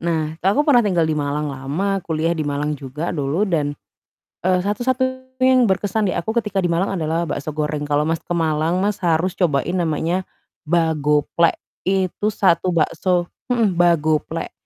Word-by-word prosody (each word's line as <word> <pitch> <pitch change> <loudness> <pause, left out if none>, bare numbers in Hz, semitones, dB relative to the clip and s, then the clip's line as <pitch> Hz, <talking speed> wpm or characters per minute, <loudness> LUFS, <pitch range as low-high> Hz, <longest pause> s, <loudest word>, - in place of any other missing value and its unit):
Nah 160 -2 -2
aku 200 +12 +2
pernah 290 -5 +5
tinggal 180 -5 +1
di 155 - 0
Malang 145 +1 -2
lama, 150 +9 -2
kuliah 160 0 0
di 155 -3 -3
Malang 145 +1 -2
juga 145 +5 -4
dulu 150 +3 -1
dan, 155 -8 0 0.7
eee, 185 0 +3
satu-satunya 260 +6 -1 0.2
yang 255 -1 +5
berkesan 205 +1 +1
di - - 0
aku 220 +7 -3
ketika 205 -3 -2
di 175 - 0
Malang 175 +4 0
adalah 160 +2 0
bakso 170 - -4
goreng. 150 -1 -2
Kalau 145 0 +2
Mas 165 +1 -1
ke 175 - -4
Malang 160 +1 +1
Mas, 205 -1 -1
harus 175 +1 +1
cobain 175 -4 0
namanya 170 +1 0 0.4
Bagoplek, 160 -1 +2 0.3
itu 190 +2 0
1 185 -4 +2
bakso 175 +3 +1 0.2
mhm, 230 -6 +2
Bagoplek, 160 -3 +1
170 Hz, 160 wpm, -21 LUFS, 155-195 Hz, 0.7 s, pernah